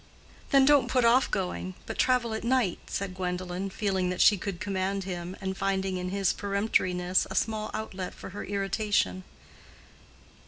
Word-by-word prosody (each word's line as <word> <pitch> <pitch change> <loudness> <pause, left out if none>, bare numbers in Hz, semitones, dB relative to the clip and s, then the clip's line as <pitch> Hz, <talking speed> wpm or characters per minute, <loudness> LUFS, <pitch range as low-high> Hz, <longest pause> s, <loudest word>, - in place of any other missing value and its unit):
"Then 275 -1 +6
don't 285 -3 +5
put 250 -1 +2
off 245 +3 +5
going, 185 0 -3
but - - -6
travel 250 -3 +2
at 220 - -4
night," 240 -6 +1
said 195 -2 -3
Gwendolen, 180 +1 -3
feeling 190 -2 -1
that 180 - -3
she 210 - +7
could 190 -1 -5
command 195 0 -1
him, 180 -1 -5
and 190 0 -3
finding 195 -1 -1
in 180 0 -3
this 195 -1 +1
peremptoriness 185 -3 +1
a - - -6
small 215 -1 0
outlet 190 -4 -5
for - - -9
her 205 - -6
irritation. 195 - 0
195 Hz, 160 wpm, -28 LUFS, 185-215 Hz, -, she